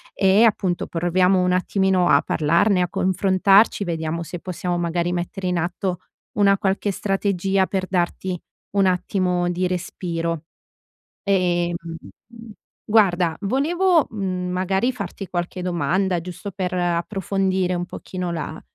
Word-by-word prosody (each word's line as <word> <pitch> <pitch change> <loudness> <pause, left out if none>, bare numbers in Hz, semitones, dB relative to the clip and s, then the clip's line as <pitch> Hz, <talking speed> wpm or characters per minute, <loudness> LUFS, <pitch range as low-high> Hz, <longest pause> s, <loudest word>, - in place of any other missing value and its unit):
E, 195 +3 +4
appunto, 190 -5 0
proviamo 180 +2 +2
un 180 - +2
attimino 185 0 +2
a - - +5
parlarne, 170 +5 +2
a 180 - 0
confrontarci, 195 +3 +3
vediamo 165 -1 -3
se 175 +1 -7
possiamo 180 -1 -3
magari 175 +1 -1
mettere 180 +2 -4
in 180 -1 0
atto 180 +1 -2 0.4
una 200 -1 +4
qualche 195 +1 0
strategia 195 -1 0
per 190 -1 -2
darti 180 0 -1 0.4
un 195 -1 +4
attimo 180 -1 0
di 180 +1 0
respiro. 170 -2 -3 0.8
Ehm, 175 -3 +1 1.1
guarda, 180 -6 +3
volevo, 325 - +2
uhm, 185 -4 -3
magari 190 +7 0
farti 200 -3 -6
qualche 175 +1 -4
domanda 180 +2 0
giusto 180 +3 -7
per 185 -1 -3
approfondire 185 +1 0
un 175 0 -2
pochino 180 -1 -5
la 160 -1 -5
185 Hz, 125 wpm, -22 LUFS, 175-195 Hz, 1.1 s, a